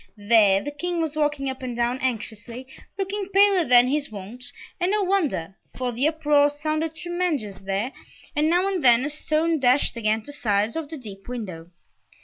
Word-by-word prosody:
There, 205 Hz, -2 st, +4 dB
the 290 Hz, -, -4 dB
King 350 Hz, +4 st, -3 dB
was 315 Hz, -2 st, -2 dB
walking 295 Hz, -2 st, 0 dB
up 265 Hz, 0 st, -4 dB
and 250 Hz, -2 st, -4 dB
down 240 Hz, +2 st, 0 dB
anxiously, 230 Hz, 0 st, -4 dB, 0.3 s
looking 395 Hz, 0 st, -3 dB
paler 395 Hz, -2 st, +5 dB
than 245 Hz, -3 st, +6 dB
his 285 Hz, +2 st, -1 dB
wont, 210 Hz, +5 st, -9 dB, 0.4 s
and 355 Hz, 0 st, +1 dB
no 415 Hz, 0 st, +1 dB
wonder, 305 Hz, -, -1 dB, 0.2 s
for 255 Hz, -1 st, -2 dB
the 250 Hz, +5 st, +1 dB
uproar 295 Hz, -2 st, +3 dB
sounded 310 Hz, +2 st, -3 dB
tremendous 325 Hz, -, -3 dB
there 195 Hz, +6 st, -2 dB, 0.4 s
and 300 Hz, +1 st, +2 dB
now 355 Hz, +3 st, +2 dB
and 380 Hz, -4 st, -2 dB
then 245 Hz, 0 st, +5 dB
a -, -, -1 dB
stone 310 Hz, +2 st, 0 dB
dashed 255 Hz, +1 st, +3 dB
against 220 Hz, -1 st, 0 dB
the 290 Hz, -, -8 dB
sides 215 Hz, -4 st, 0 dB
of 320 Hz, -3 st, -4 dB
the 320 Hz, -, -6 dB
deep 200 Hz, -6 st, -11 dB
window. 185 Hz, -9 st, -6 dB
275 Hz, 180 wpm, -24 LUFS, 230-320 Hz, 0.4 s, than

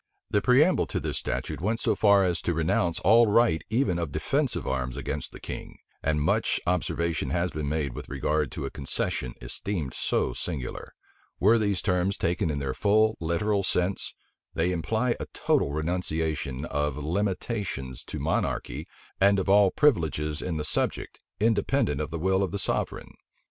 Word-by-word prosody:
The 105 Hz, -, +3 dB
preamble 140 Hz, -, +4 dB
to -, -, -2 dB
this -, -, -3 dB
statute -, -, -3 dB
went 110 Hz, +5 st, 0 dB
so -, -, +1 dB
far 100 Hz, -2 st, +5 dB
as 90 Hz, -2 st, 0 dB
to 85 Hz, -, -1 dB
renounce 80 Hz, +1 st, +1 dB
all 115 Hz, +4 st, +6 dB
right 105 Hz, -6 st, +3 dB
even 110 Hz, -7 st, +1 dB
of 85 Hz, -4 st, -3 dB
defensive -, -, 0 dB
arms 65 Hz, -1 st, -2 dB
against 70 Hz, -, -4 dB
the -, -, -11 dB
king; -, -, -7 dB, 0.2 s
and 75 Hz, 0 st, +1 dB
much 75 Hz, -, +1 dB
observation 85 Hz, -2 st, 0 dB
has 90 Hz, 0 st, 0 dB
been 75 Hz, -2 st, -3 dB
made 75 Hz, -4 st, -1 dB
with -, -, -8 dB
regard 70 Hz, +1 st, 0 dB
to -, -, -4 dB
a -, -, -4 dB
concession 65 Hz, -2 st, -3 dB
esteemed 75 Hz, +1 st, -3 dB
so -, -, 0 dB
singular. 70 Hz, -8 st, -5 dB, 0.4 s
Were 110 Hz, +4 st, +5 dB
these 100 Hz, -3 st, 0 dB
terms 90 Hz, 0 st, +1 dB
taken 85 Hz, -1 st, 0 dB
in 75 Hz, -, -1 dB
their 70 Hz, -2 st, -2 dB
full 110 Hz, +4 st, +3 dB
literal 85 Hz, +5 st, 0 dB
sense, 95 Hz, 0 st, 0 dB, 0.4 s
they 85 Hz, +3 st, +1 dB
imply 110 Hz, +8 st, 0 dB
a -, -, -5 dB
total 70 Hz, -, +1 dB
renunciation 80 Hz, -3 st, -2 dB
of 75 Hz, -1 st, -1 dB
limitations 90 Hz, -, -2 dB
to -, -, -6 dB
monarchy, -, -, -2 dB, 0.3 s
and 100 Hz, +1 st, +5 dB
of 95 Hz, 0 st, -1 dB
all 100 Hz, 0 st, +6 dB
privileges 80 Hz, -, +1 dB
in 85 Hz, -3 st, -2 dB
the 75 Hz, -, -2 dB
subject, 75 Hz, -, -1 dB, 0.2 s
independent 105 Hz, -, +2 dB
of -, -, -3 dB
the 80 Hz, -, -4 dB
will 95 Hz, +3 st, +1 dB
of 95 Hz, -, 0 dB
the 100 Hz, -, -3 dB
sovereign. 95 Hz, -, -2 dB
85 Hz, 170 wpm, -27 LUFS, 75-100 Hz, 0.4 s, all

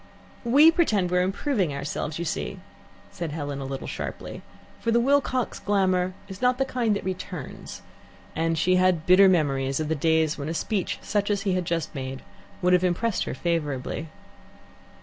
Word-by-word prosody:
"We 285 Hz, +7 st, +7 dB
pretend 215 Hz, -, +1 dB
we're 180 Hz, 0 st, +3 dB
improving 190 Hz, -, 0 dB
ourselves, 145 Hz, +2 st, -3 dB
you 170 Hz, -, -3 dB
see," -, -, -3 dB, 0.5 s
said 165 Hz, -4 st, -5 dB
Helen 145 Hz, -3 st, -4 dB
a -, -, -4 dB
little 135 Hz, 0 st, -5 dB
sharply, -, -, -6 dB, 0.4 s
for 230 Hz, -, -2 dB
the 235 Hz, -, +4 dB
Wilcox 260 Hz, -1 st, +1 dB
glamour 185 Hz, -2 st, +1 dB
is 190 Hz, -1 st, -9 dB
not 250 Hz, 0 st, +3 dB
of -, -, -20 dB
the 270 Hz, -, +1 dB
kind 240 Hz, -5 st, 0 dB
that -, -, -4 dB
returns, 180 Hz, -5 st, -6 dB, 0.5 s
and 165 Hz, +1 st, 0 dB
she 185 Hz, +3 st, +3 dB
had 180 Hz, -3 st, +2 dB
bitter 190 Hz, +2 st, +7 dB
memories 135 Hz, -6 st, +1 dB
of 155 Hz, -1 st, -2 dB
the -, -, +2 dB
days 160 Hz, 0 st, +1 dB
when 140 Hz, +2 st, -3 dB
a 165 Hz, -, -3 dB
speech 190 Hz, +3 st, -1 dB
such 205 Hz, -1 st, 0 dB
as 200 Hz, -1 st, 0 dB
he 195 Hz, -3 st, +1 dB
had 180 Hz, -1 st, -1 dB
just 165 Hz, -2 st, -2 dB
made 130 Hz, -2 st, -5 dB, 0.4 s
would 180 Hz, 0 st, +4 dB
have 180 Hz, 0 st, +4 dB
impressed 185 Hz, +4 st, 0 dB
her -, -, -4 dB
favourably. 150 Hz, -3 st, -2 dB
180 Hz, 180 wpm, -25 LUFS, 155-205 Hz, 0.5 s, We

